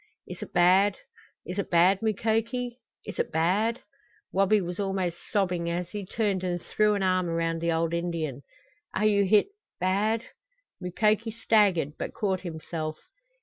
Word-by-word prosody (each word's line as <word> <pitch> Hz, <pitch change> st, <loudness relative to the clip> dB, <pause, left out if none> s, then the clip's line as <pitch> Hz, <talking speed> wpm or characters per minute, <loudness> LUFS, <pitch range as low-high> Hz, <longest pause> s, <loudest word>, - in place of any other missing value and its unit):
"Is -, -, -8 dB
it -, -, -7 dB
bad? 190 Hz, +3 st, +4 dB, 0.5 s
Is 185 Hz, +2 st, -4 dB
it 200 Hz, -, -2 dB
bad, 180 Hz, +3 st, +4 dB
Mukoki? 225 Hz, +3 st, -1 dB, 0.3 s
Is 205 Hz, -, -7 dB
it -, -, 0 dB
bad 205 Hz, -, +1 dB, 0.2 s
" 430 Hz, -, -36 dB
Wabi 195 Hz, +2 st, +4 dB
was 180 Hz, -1 st, -5 dB
almost 190 Hz, -3 st, -1 dB
sobbing 180 Hz, -4 st, 0 dB
as 175 Hz, +1 st, -3 dB
he 205 Hz, -3 st, -5 dB
turned 200 Hz, -3 st, -1 dB
and 175 Hz, -1 st, -1 dB
threw 210 Hz, +4 st, +1 dB
an 200 Hz, -, -1 dB
arm 185 Hz, -2 st, +2 dB
around 165 Hz, 0 st, -1 dB
the 170 Hz, 0 st, +1 dB
old 165 Hz, 0 st, 0 dB
Indian. 165 Hz, -6 st, -2 dB, 0.5 s
"Are 215 Hz, -, +1 dB
you 200 Hz, -2 st, +4 dB
hit 210 Hz, -, +4 dB, 0.3 s
bad?" 210 Hz, +5 st, +1 dB, 0.6 s
Mukoki 215 Hz, +5 st, +1 dB
staggered, 205 Hz, -9 st, +2 dB
but -, -, -4 dB
caught 190 Hz, -4 st, 0 dB
himself. 160 Hz, -2 st, -5 dB
190 Hz, 155 wpm, -27 LUFS, 170-210 Hz, 0.6 s, bad